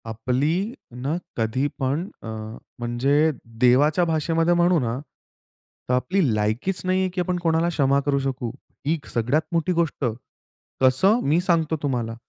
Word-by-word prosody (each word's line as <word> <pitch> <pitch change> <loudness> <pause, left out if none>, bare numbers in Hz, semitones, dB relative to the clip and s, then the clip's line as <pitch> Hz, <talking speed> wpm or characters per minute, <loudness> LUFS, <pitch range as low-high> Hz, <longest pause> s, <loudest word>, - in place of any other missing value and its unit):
आपली 125 +7 0 0.5
ना 145 +6 -1 0.2
कधी 120 +5 0
पण 140 +7 0 0.2
अ, - - -7 0.5
म्हणजे 135 +6 +2 0.3
देवाच्या 145 +7 +4
भाषेमध्ये 165 +1 +1
म्हणू 175 0 +3
ना, 120 -1 -2 0.9
तर - - +2
आपली 180 +10 +1
लायकीच 110 - -1
नाहीये 185 0 +1
की 180 - -1
आपण 180 0 -1
कोणाला 165 +1 +2
क्षमा 140 -4 +2
करू 140 -1 +2
शकू. 130 -3 -3 0.4
ही 160 +1 +1
सगळ्यात 125 +7 +2
मोठी 170 +1 +1
गोष्ट. 165 -4 0 0.8
कसं? 135 - +4
मी 155 +4 +3
सांगतो 165 -3 +1
तुम्हाला. 120 -5 -1
145 Hz, 135 wpm, -23 LUFS, 125-170 Hz, 0.9 s, देवाच्या